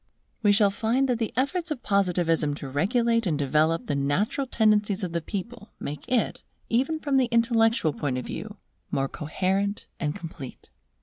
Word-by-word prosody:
We 205 -2 +5
shall 205 -1 +4
find 235 +5 +1
that 245 -3 0
the 225 - -1
efforts 330 +6 0
of 295 -5 -4
Positivism 175 -6 +1
to 145 - -7
regulate 230 - +1
and 155 -4 +1
develop 155 +4 +2
the - - -1
natural 165 - 0
tendencies 210 -3 +2
of 180 - -2
the 170 0 -1
people, 210 +5 -6
make 150 +10 -6
it, 245 -3 +1 0.3
even 270 +7 +1
from 285 -3 +1
the 260 - +4
intellectual 230 - +3
point 135 -3 -2
of 125 - -4
view, - - -6 0.3
more 135 0 0
coherent 190 +8 -1
and 150 -3 -1
complete. 160 -6 -9
200 Hz, 170 wpm, -26 LUFS, 155-235 Hz, 0.3 s, We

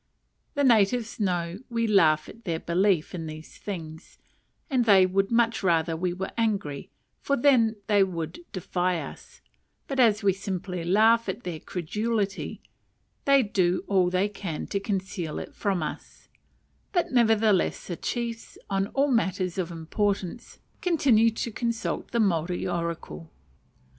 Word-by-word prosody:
The 285 - +1
natives 230 -1 +3
know 175 -2 -1
we 230 -1 0
laugh 165 -8 +4
at 230 +2 -13
their 165 -4 -2
belief 180 -1 +1
in 165 -3 -5
these 155 0 -10
things, 160 -5 -7 0.5
and 255 -5 +1
they 195 -4 +7
would 195 +1 +1
much 230 -1 +2
rather 165 -3 +2
we 175 +2 -1
were 190 +2 -4
angry, 200 -11 -1 0.3
for 280 - 0
then 240 -4 +4
they 205 -2 +4
would 175 - -4
defy 180 -1 -1
us; - - -10 0.5
but 270 -1 -3
as 225 -4 +4
we 195 -1 +4
simply 185 -2 -4
laugh 220 +5 +4
at 200 +6 -4
their 170 -3 -5
credulity, 205 +5 -3 0.6
they 275 -1 +5
do 185 -4 +1
all 185 -3 +2
they 185 +2 +1
can 195 -6 -5
to 200 - -1
conceal 190 -5 -3
it - - -7
from 195 -5 -1
us: - - -8 0.6
but 350 -7 0
nevertheless 220 -5 +3
the 175 - -4
chiefs, 235 +3 -4
on 195 0 +1
all 275 +1 +3
matters 190 -6 0
of 180 -2 -1
importance, 190 +5 -3 0.2
continue 270 -10 +4
to 230 +1 -4
consult 230 +1 -3
the 235 - -1
Maori 175 -4 +1
oracle. 170 - -4
195 Hz, 145 wpm, -26 LUFS, 175-225 Hz, 0.6 s, they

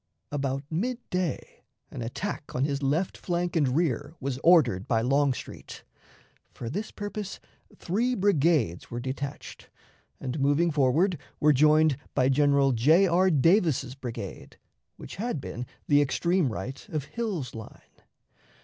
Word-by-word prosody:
About 135 -1 -2
mid 235 +10 -1
day 180 -2 -3 0.3
an - - -6
attack 145 - -5
on 130 +2 +1
his 140 -1 -2
left 150 +7 0
flank 175 -1 -2
and 140 -5 +2
rear 145 -1 -1
was 135 -1 -3
ordered 130 - +4
by 115 -2 +2
Longstreet. 135 +2 -1 0.7
For 115 -1 -7
this 205 +8 -3
purpose 205 -1 -6 0.4
three 235 +8 0
brigades 160 - +1
were 120 - -4
detached, 135 +3 -6 0.5
and, 135 +2 -4
moving 145 +5 +2
forward, 150 +5 +2 0.2
were 150 0 +5
joined 155 0 +4 0.2
by 130 +1 +3
General 140 0 +3
J. 150 +11 +4
R. 185 +1 +3
Davis's 160 - +2
brigade, 125 -3 -8 0.4
which - - -10
had 225 -5 -2
been 125 -1 -6 0.2
the 145 -1 +5
extreme 170 +1 +1
right 115 +8 -6
of 155 -3 -2
Hill's 195 - -4
line. 110 -1 -12
145 Hz, 135 wpm, -27 LUFS, 130-175 Hz, 0.7 s, were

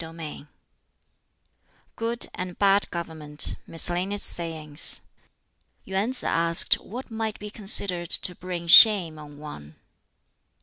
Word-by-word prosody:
BOOK 165 0 -11
XIV 155 -3 -10 1.5
Good 230 +1 -3
and 180 -1 -7
Bad 200 0 +1
Government 160 -3 -1
Miscellaneous 180 +4 +1
Sayings 160 -3 -2 0.9
Yuen 195 +4 -3
Sz 260 - -10
asked 165 0 +2
what 245 +3 -11
might 220 -1 -5
be 210 0 -10
considered 195 -5 +1
to 180 - +1
bring 175 -1 -8
shame 175 -3 +7
on 145 -1 -13
one. 80 - -12
175 Hz, 115 wpm, -24 LUFS, 160-200 Hz, 1.5 s, shame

